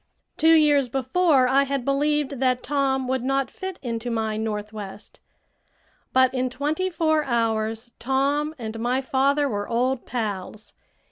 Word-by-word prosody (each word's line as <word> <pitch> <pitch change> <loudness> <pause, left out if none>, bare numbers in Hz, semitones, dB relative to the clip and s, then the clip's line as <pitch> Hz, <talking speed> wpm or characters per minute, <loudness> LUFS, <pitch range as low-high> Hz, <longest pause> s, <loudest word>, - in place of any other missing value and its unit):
Two 325 +1 +5
years 290 -4 +4
before 270 +2 +2
I 270 +2 +4
had 275 -2 -2
believed 285 -1 0
that 255 -1 +1
Tom 270 -2 0
would 260 -1 -1
not 270 +1 0
fit 375 -1 -6
into 235 -1 -3
my 220 -2 -1
Northwest. 210 -2 -6 0.9
But 260 0 +4
in 255 0 0
twenty 300 +8 -1
four 315 -3 +1
hours 225 -2 -1
Tom 280 +4 0
and 225 -2 -6
my 245 +3 0
father 275 +2 +1
were 205 -5 -3
old 245 +2 0
pals. 215 -3 -5
260 Hz, 140 wpm, -24 LUFS, 230-285 Hz, 0.9 s, Two